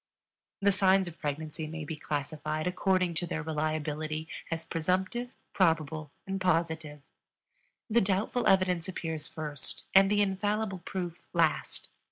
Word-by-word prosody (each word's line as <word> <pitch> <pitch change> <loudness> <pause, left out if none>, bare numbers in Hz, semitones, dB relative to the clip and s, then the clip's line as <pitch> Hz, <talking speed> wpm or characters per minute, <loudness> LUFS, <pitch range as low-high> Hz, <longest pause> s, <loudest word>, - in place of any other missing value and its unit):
The 200 - +6
signs 190 -1 +4
of 170 -1 -9
pregnancy 155 +1 -3
may 160 0 -5
be 160 - -4
classified, 155 +1 -3
according 185 -1 +2
to 175 +2 -1
their 160 0 -2
reliability, 155 0 -2 0.2
as 165 -1 -3
presumptive, 185 +9 0 0.2
probable, 160 -4 +2 0.2
and 195 0 -3
positive. 160 -4 0 0.8
The 235 +1 +4
doubtful 200 +5 +1
evidence 185 -3 +3
appears 160 -4 -3
first 150 -3 -4
and 195 0 +7
the 205 0 +4
infallible 205 0 0
proof 175 -1 -4
last. 165 -3 +1
165 Hz, 130 wpm, -30 LUFS, 155-190 Hz, 0.8 s, and